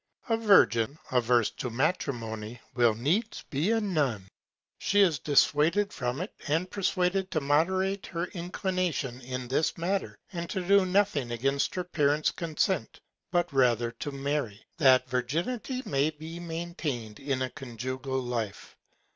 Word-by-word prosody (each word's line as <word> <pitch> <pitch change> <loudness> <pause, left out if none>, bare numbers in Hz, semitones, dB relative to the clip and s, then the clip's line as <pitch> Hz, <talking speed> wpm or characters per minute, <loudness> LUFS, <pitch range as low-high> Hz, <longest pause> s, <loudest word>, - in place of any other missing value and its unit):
A 225 - +4
Virgin 140 - +4
averse 120 -2 +3
to 125 - -5
Matrimony, 115 -4 -2
will 120 -3 +3
needs 175 - 0
be 150 +8 +1
a 225 0 +3
Nun. 145 - 0 0.5
She 205 +1 +3
is 170 -8 +4
dissuaded 155 +8 +3
from 125 +4 -2
it, 185 - -5
and 160 +5 +1
persuaded 190 -1 0
to 155 - 0
moderate 185 +7 +1
her 170 -1 -2
Inclination 175 - -2
in 125 0 -5
that 145 +4 +1
Matter, 190 +4 -2 0.2
and 170 -1 -4
to 190 -3 -3
do 200 -1 +5
nothing 185 -9 +2
against 135 +4 0
her 180 - -1
Parents 150 -3 +1
Consent, 170 +2 -1 0.3
but 175 -3 0
rather 120 -3 +3
to 145 - -3
marry. 140 -6 -3
That 130 -3 +5
Virginity 170 - -2
may 140 +2 +2
be 160 +2 -8
maintain'd 160 -10 -4
in 135 -2 -1
a 130 - -3
conjugal 130 +2 -4
Life. 115 -4 -4
145 Hz, 140 wpm, -29 LUFS, 125-180 Hz, 0.5 s, do